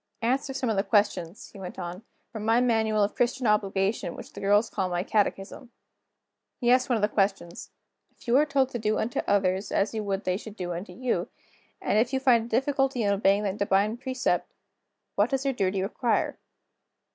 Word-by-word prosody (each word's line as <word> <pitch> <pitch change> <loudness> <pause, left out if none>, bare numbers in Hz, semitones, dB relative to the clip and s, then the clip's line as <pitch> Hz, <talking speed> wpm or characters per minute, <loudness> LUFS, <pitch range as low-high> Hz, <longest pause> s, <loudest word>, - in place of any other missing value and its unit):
"Answer 265 +4 0
some 260 - -1
of 220 - +1
the - - +4
questions," 200 -3 0
he 200 - -11
went 185 -2 -8
on, 180 +1 -6 0.3
"from 220 -3 -6
my 225 +2 +3
Manual 220 -3 +2
of 200 - 0
Christian 245 +1 0
Obligation, 200 -1 0
which - - -11
the - - -8
girls 205 +3 +3
call 190 -3 -2
my 175 0 -1
catechism." 210 +3 -1 0.9
He 240 -2 +2
asked 255 +1 +3
one 245 - +3
of 215 - -1
the - - +5
questions: 195 -4 -1 0.4
"If - - -22
you 235 - +3
are 295 - +5
told 275 -2 +2
to 240 - -4
do 215 0 0
unto 235 +2 -2
others 190 0 +1
as 200 +3 +1
you 220 -1 -2
would 200 0 -2
they 185 0 0
should 215 0 -10
do 175 -4 -4
unto 175 +5 -6
you, 255 -1 -2 0.5
and 210 - +1
if 240 +4 +1
you 265 - +2
find 245 -4 +4
a - - -10
difficulty 270 0 +1
in 200 -1 +2
obeying 200 +1 +2
that 200 -1 -2
Divine 200 +2 +2
Precept, 260 0 -1 0.6
what 205 +4 +2
does 270 0 -1
your 275 - +1
duty 190 -4 0
require?" 230 +4 -1
215 Hz, 205 wpm, -27 LUFS, 195-245 Hz, 0.9 s, the